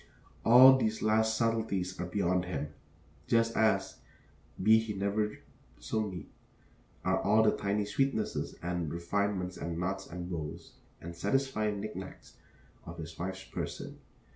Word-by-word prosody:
All 130 +3 +9
these 110 -2 -1
last 110 0 +2
subtleties 110 -6 -1
are 90 - -2
beyond 90 -1 0
him, 75 -4 -4 0.6
just 115 0 +2
as, 110 0 +2 0.7
be 110 +2 +7
he 110 -2 -4
never 105 +2 -1 0.4
so 110 -1 -2
neat, 90 -5 -8 0.7
are - - +2
all 110 +2 +4
the 110 - +5
tiny 100 +1 -1
sweetnesses 110 +1 -1
and 90 -3 -2
refinements 90 +1 -1
and 85 -1 -4
knots 95 +2 -3
and 90 +1 -6
bows 80 -4 -6 0.3
and 85 +1 -8
satisfying 105 +1 0
knick 105 +1 -6
knacks 95 0 -9 0.5
of 85 0 -9
his 80 -1 -8
wife's 95 +1 -4
person. - - -6
100 Hz, 140 wpm, -31 LUFS, 90-110 Hz, 0.7 s, All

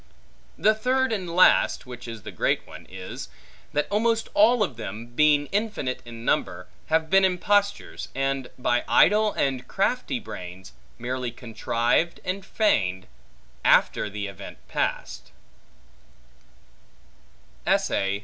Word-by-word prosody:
The 215 - +4
third 255 +3 +1
and 185 -5 -3
last 180 +2 +4
(which 125 -1 -9
is 115 -3 -8
the - - -7
great - - 0
one) - - -12
is, 95 0 -8 0.4
that 150 0 0
almost 225 +2 +1
all 220 +2 +5
of 160 - -3
them, 110 0 -6
being 145 +4 +3
infinite 200 - -2
in 115 0 -9
number, 90 -1 0 0.2
have 160 0 +1
been 195 0 +6
impostures, 200 +2 +1
and 135 -1 -1
by 120 -1 +1
idle 210 +1 +5
and 130 -2 -1
crafty 245 +5 -1
brains 90 - -9 0.2
merely 125 +1 -3
contrived 120 +6 -1
and 190 +2 -3
feigned, 95 - +1 0.6
after - - +3
the 100 0 -4
event 100 -3 -9
past. - - -3
145 Hz, 120 wpm, -25 LUFS, -, 0.6 s, been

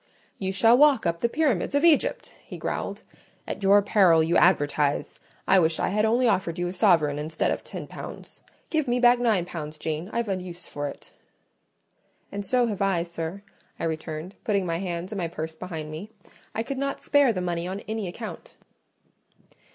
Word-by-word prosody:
"You 190 -1 -1
shall 225 +5 +5
walk 285 -7 +5
up 170 0 0
the 235 - +1
pyramids 280 - 0
of 285 - +2
Egypt!" 340 - +2
he - - -9
growled. - - -4 0.4
"At - - -5
your 200 +1 +5
peril 185 -6 +5
you 165 +2 +1
advertise! 145 -4 +2 0.3
I 195 - +6
wish 160 -2 +1
I - - +1
had 210 +3 +1
only 240 +3 +3
offered 185 -6 0
you 175 0 -1
a 175 - -4
sovereign 165 -7 +3
instead 155 +1 -1
of - - -3
ten - - -7
pounds. - - -10 0.3
Give 310 -4 +1
me 245 +1 +1
back 245 0 +5
nine 220 -8 +2
pounds, 155 -3 -7
Jane; 160 +4 -3
I've 235 -1 -1
a 195 - 0
use 180 -1 -9
for 145 0 -4
it." 140 - -10 1.2
"And 200 0 -4
so 245 +5 +2
have 210 -5 -3
I, 190 -4 +2
sir," 170 +3 -6 0.4
I - - -5
returned, 160 +2 -4
putting 200 -3 +1
my 165 -1 -1
hands 180 0 -4
and 205 - -3
my 170 - -1
purse 160 -1 -5
behind 160 -2 -6
me. 160 +7 -7 0.5
"I 225 - 0
could 270 +2 -4
not 275 0 -3
spare 285 -3 +4
the 190 - -3
money 175 -1 -2
on 190 +2 -4
any 220 -2 -4
account." 215 +6 -8
185 Hz, 190 wpm, -26 LUFS, 165-225 Hz, 1.2 s, I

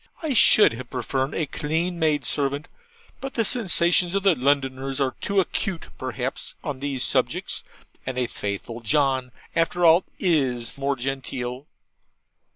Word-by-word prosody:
I 305 -3 0
should 215 - +6
have 125 +1 -8
preferred 130 +2 -2
a 160 - 0
clean 165 +4 -2
maidservant, 145 -2 0 0.5
but 270 0 -6
the 230 - +2
sensations 180 -6 +3
of 200 0 0
Londoners 135 -4 +1
are 135 -2 +1
too 200 -1 +1
acute 190 -1 -2
perhaps 130 0 -4
on 145 -3 -4
these 135 -2 -2
subjects; - - -1 0.4
and 130 -1 -4
a 125 - +1
faithful 105 +1 -5
John, 130 0 +1 0.2
after 170 +1 +2
all, 165 +3 +7
IS 130 - +1
more 140 0 -1
genteel. 130 0 -4
140 Hz, 135 wpm, -24 LUFS, 130-170 Hz, 0.5 s, all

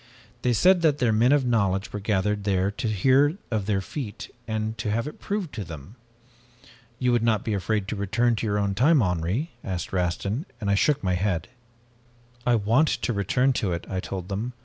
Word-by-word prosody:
They 125 - +1
said 180 - +4
that 155 -4 +3
their 120 -5 +2
men 115 +4 +4
of 145 -3 +3
knowledge 100 -5 0
were 105 - -3
gathered 105 0 0
there 95 -1 +1
to 110 - -4
hear 130 - +3
of 105 -3 -1
their 100 -2 +1
feat, 115 0 -7
and 110 0 -2
to 110 -1 -2
have 115 +4 -1
it 150 - -8
proved 200 -6 -3
to 110 -2 -4
them. 80 - -10 1.0
"'You 125 0 +1
would 120 -1 +2
not 110 -3 +1
be 110 - -1
afraid 100 +1 -1
to - - -2
return 115 +4 +1
to 110 - -2
your 105 0 0
own 100 -1 0
time, 135 +5 +4
Henri?' 90 - -1
asked 90 -1 -4
Rastin, 100 - -1
and 100 -3 -1
I - - +4
shook 135 +7 +2
my 95 -2 +1
head. 90 -3 -1 1.0
"'I 120 - +5
want 115 +8 +3
to 120 - -1
return 125 +7 +2
to 95 -4 0
it,' 85 - -4
I 95 - -1
told 90 -1 -5
them. 110 +6 -3
110 Hz, 205 wpm, -25 LUFS, 95-125 Hz, 1.0 s, I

